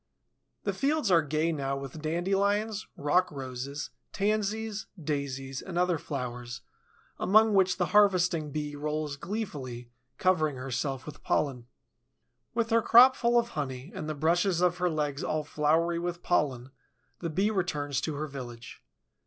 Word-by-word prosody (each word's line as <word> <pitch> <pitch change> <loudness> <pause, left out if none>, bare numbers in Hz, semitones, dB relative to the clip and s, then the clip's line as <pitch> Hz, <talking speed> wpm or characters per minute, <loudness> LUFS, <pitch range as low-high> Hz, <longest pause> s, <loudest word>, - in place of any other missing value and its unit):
The - - -1
fields 290 -6 +1
are 170 -2 +6
gay 155 +2 0
now 140 -3 -2
with 135 +3 -7
dandelions, 200 +6 0
rock 175 +6 +2
roses, 135 +1 -5 0.2
tansies, 215 +1 -1
daisies, 135 -3 -3
and 185 -2 -6
other 180 -2 +2
flowers, 125 -2 -5 0.6
among 215 +3 +5
which 190 -2 +3
the 180 - +2
harvesting 180 -6 +4
Bee 150 0 -3
rolls 150 0 -2
gleefully, 140 - -5 0.3
covering 160 -6 +2
herself 130 +1 -3
with 150 -1 -9
pollen. 125 -5 -1 0.9
With 230 -1 0
her 230 0 +5
crop 250 +4 +8
full 240 0 +2
of 235 0 +2
honey 135 - -5
and 155 - -5
the 155 - -2
brushes 170 +4 +2
of 180 0 +2
her 180 0 +2
legs 150 -3 -2
all 155 0 -1
floury 160 +3 +1
with 175 0 -4
pollen, 135 -7 0 0.5
the 170 - -3
Bee 195 +7 +1
returns 150 -8 -1
to 155 - -2
her 150 +2 -2
village. 125 -5 -9
155 Hz, 145 wpm, -29 LUFS, 140-190 Hz, 0.9 s, crop